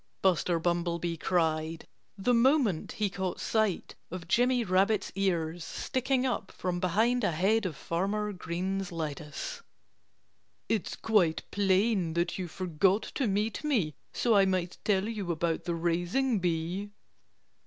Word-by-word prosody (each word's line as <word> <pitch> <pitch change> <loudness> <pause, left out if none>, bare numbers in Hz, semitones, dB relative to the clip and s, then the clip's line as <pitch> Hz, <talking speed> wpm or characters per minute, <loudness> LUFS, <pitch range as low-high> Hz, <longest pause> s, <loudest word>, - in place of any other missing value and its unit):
Buster 180 -2 +3
Bumblebee 170 0 -1
cried, 160 -1 0 0.3
the 200 +6 +2
moment 235 - +3
he 210 - 0
caught 190 -1 -3
sight 220 -5 0 0.2
of 175 -1 -7
Jimmy 245 +5 +3
Rabbit's 195 +1 +2
ears 175 -4 -1
sticking 260 +7 -1
up 240 -6 -2
from 180 -1 -3
behind 220 +8 +2
a - - +3
head 195 +6 +2
of 165 - -6
Farmer 200 +7 -1
Green's 185 +1 -3
lettuce. 155 - -5 1.1
"It's 220 -4 -1
quite 185 -8 +2
plain 195 -3 +2
that 175 +2 0
you 180 - -3
forgot 185 +3 +1
to 270 - 0
meet 210 +6 -1
me, 225 - +1 0.2
so 235 - +2
I 195 -1 +6
might 185 -2 -1
tell 200 -1 +2
you 205 -6 -3
about 165 0 -1
the 170 -2 -1
raising 175 +9 +1
bee." 175 +3 -1
185 Hz, 135 wpm, -30 LUFS, 170-215 Hz, 1.1 s, I